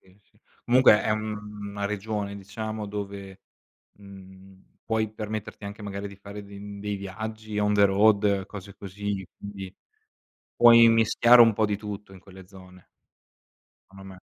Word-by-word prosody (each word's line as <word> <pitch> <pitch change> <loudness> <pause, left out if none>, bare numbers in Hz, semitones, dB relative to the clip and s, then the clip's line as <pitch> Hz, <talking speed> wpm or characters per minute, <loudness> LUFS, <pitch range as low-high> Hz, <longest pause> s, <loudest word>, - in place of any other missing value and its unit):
sì, 95 +1 -25
sì. - - -33 0.2
Comunque, 120 -4 +5
è, 110 - +1
mhmm, 105 -1 -5
una 100 0 -5
regione, 105 0 -3
diciamo, 110 +2 -6
dove, 100 -1 -7 0.6
mhmm, 95 -1 -16
puoi 110 -1 -1
permetterti 110 -1 -6
anche, 105 +1 -9
magari, 100 0 -5
di 100 - -13
fare 100 +1 -10
de 100 0 -12 0.2
dei 105 0 -3
viaggi 110 +2 -6
on 105 0 +1
the 100 0 +5
road, 100 -1 +3
cose 100 -1 -10
così, 100 0 -5
quindi, 100 -2 -8 0.9
puoi 115 -1 +8
mischiare 115 +2 +5
un 115 -1 +6
po' 110 +1 +1
di 100 -1 -1
tutto 105 -1 -8
in 95 - -13
quelle 95 -1 -15
zone. 90 -2 -16 1.0
Cono 95 0 -14
me. 95 -1 -11
100 Hz, 150 wpm, -26 LUFS, 95-110 Hz, 1.0 s, puoi